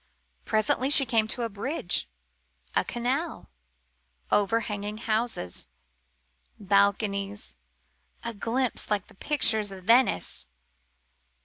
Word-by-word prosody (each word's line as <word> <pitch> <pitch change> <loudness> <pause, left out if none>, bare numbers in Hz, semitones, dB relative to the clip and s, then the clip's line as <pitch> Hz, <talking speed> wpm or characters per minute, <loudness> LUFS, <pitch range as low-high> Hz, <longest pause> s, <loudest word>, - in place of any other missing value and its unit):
Presently 220 +4 +1
she 280 -1 +8
came 225 -2 +2
to 240 +2 -1
a - - 0
bridge 205 - -2 0.7
a - - +3
canal 260 +8 -3 0.8
overhanging 210 0 0
houses 220 - -2 0.9
balconies 200 0 +1 0.7
a 235 - -4
glimpse 235 +4 -1
like 205 -2 -1
the - - -16
pictures 220 -5 +2
of 190 -1 -10
Venice. 230 - +2
220 Hz, 95 wpm, -27 LUFS, 200-240 Hz, 0.9 s, she